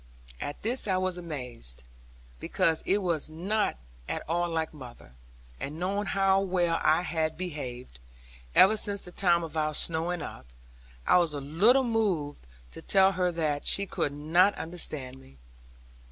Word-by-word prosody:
At 145 - -6
this 235 +2 +4
I 190 -2 +1
was 185 -1 -1
amazed, 125 - -6 0.6
because 160 - 0
it 200 +1 +2
was 165 -4 -1
not 195 - -1 0.3
at - - -4
all 175 +2 0
like 160 -1 -2
mother; 125 - -12 0.5
and 150 +3 -5
knowing 195 +3 -1
how 195 0 +3
well 175 -3 0
I 160 +3 +3
had 160 -2 -2
behaved, 130 - -6 0.6
ever 210 +3 +7
since 205 -1 -1
the 180 - -8
time 175 -2 +2
of 160 -1 -7
our 155 -1 0
snowing 165 +2 0
up, 65 - -9 0.6
I - - +5
was 165 -4 0
a - - -3
little 195 - +3
moved 190 - -1 0.2
to - - -10
tell 195 -1 +4
her 180 -1 0
that 150 -3 -1
she 200 - +3
could 150 - -2
not 165 +7 +3
understand 150 -6 -4
me. 65 - -18
170 Hz, 155 wpm, -28 LUFS, 150-190 Hz, 0.6 s, ever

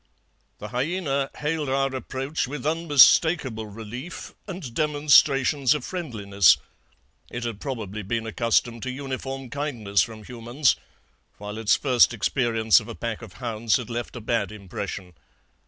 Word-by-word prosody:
"The 105 - -8
hyaena 140 - -1
hailed 150 -1 -2
our 135 0 +1
approach 135 +2 -3
with 145 -1 -6
unmistakable 150 -6 +4
relief 115 - -8
and 175 - -7
demonstrations 145 -2 +4
of 145 - -4
friendliness. 105 - +2 0.7
It 120 - -5
had 115 -4 -4
probably 110 -7 -4
been 115 +3 -2
accustomed 115 +1 0
to 130 - -3
uniform 135 -1 -5
kindness 120 -9 0
from 110 -2 -4
humans, 120 +4 0 0.6
while 105 +1 -7
its 110 -2 +4
first 125 -3 +4
experience 115 -3 +3
of 110 - -11
a 115 - -7
pack 115 -1 -4
of 110 -6 -11
hounds 115 -3 -1
had 125 -2 -7
left 120 +2 -4
a 120 - -6
bad 115 +1 -1
impression. 100 -3 -6
120 Hz, 140 wpm, -25 LUFS, 110-140 Hz, 0.7 s, unmistakable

